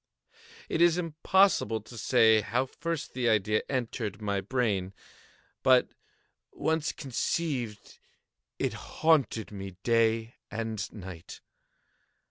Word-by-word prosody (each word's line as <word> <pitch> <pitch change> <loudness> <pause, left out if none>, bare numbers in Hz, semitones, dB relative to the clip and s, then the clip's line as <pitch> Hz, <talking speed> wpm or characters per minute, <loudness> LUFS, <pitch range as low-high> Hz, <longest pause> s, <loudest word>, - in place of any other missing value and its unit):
It 160 - -1
is 170 0 +5
impossible 170 - +2
to 120 - -13
say 110 -2 +4
how 125 +5 0
first 165 +3 -4
the 125 -2 +1
idea 105 -1 +2
entered 115 -5 -3
my 100 -2 -1
brain; 100 -4 -1 0.7
but 130 -1 +5 0.6
once 160 -1 0
conceived, 130 -5 -3 0.6
it - - -1
haunted 145 -10 +1
me 95 -2 -7
day 115 0 +2
and 110 -2 -4
night. 95 -4 -10
115 Hz, 100 wpm, -29 LUFS, 105-135 Hz, 0.7 s, is